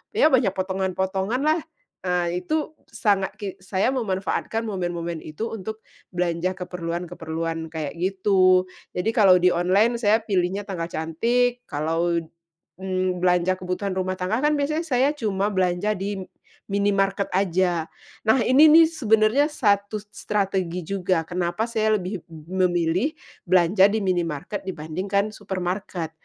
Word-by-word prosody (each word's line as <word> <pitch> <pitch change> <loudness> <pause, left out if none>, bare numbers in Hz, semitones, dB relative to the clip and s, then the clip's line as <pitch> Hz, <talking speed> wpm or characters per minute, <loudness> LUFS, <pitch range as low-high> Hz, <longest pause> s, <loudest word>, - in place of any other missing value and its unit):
ya 310 - +5
banyak 245 -9 +3
potongan-potongan 190 +3 -1
lah, 310 +3 +2 0.5
eee, 180 0 -1
itu 310 0 -2
sangat 205 -4 0
ki 205 - -3
saya 190 +4 0
memanfaatkan 220 -2 -1
momen-momen 175 -5 -3
itu 155 +9 -4
untuk 220 +1 -6 0.3
belanja 175 +1 0
keperluan-keperluan 165 -2 -4
kayak 155 -3 -4
gitu. 185 0 +3 0.2
Jadi, 180 +5 -1
kalau 190 -6 +6
di 180 - +5
online 190 +7 +2
saya 220 -1 +3
pilihnya 195 -2 0
tanggal 175 -4 -3
cantik, 240 +10 0
kalau, 165 +3 0 0.6
mmm, 185 -1 -1
belanja 180 +1 +2
kebutuhan 185 +2 -3
rumah 185 0 -1
tangga 190 +7 -1
kan 300 - +3
biasanya 305 +3 -1
saya 265 -2 +2
cuma 205 -7 -1
belanja 185 +1 +1
di 195 +1 -3
m - - -7 0.5
minimarket 200 0 +1
aja. 180 -3 +1 0.4
Nah, 220 +4 +5
ini 270 +5 +7
nih 325 +1 +8
sebenarnya 225 -3 +3
satu 205 -5 +1
s 210 - -17
strategi 190 -4 -1
juga, 185 -3 0
kenapa 180 +4 -1
saya 220 -2 +2
lebih 185 0 -5
m 165 +4 -3
memilih 175 - +1 0.3
belanja 185 +2 +5
di 220 - 0
minimarket 175 0 -2
dibandingkan 190 +5 -2
supermarket. 185 -3 -4
190 Hz, 135 wpm, -24 LUFS, 180-215 Hz, 0.6 s, nih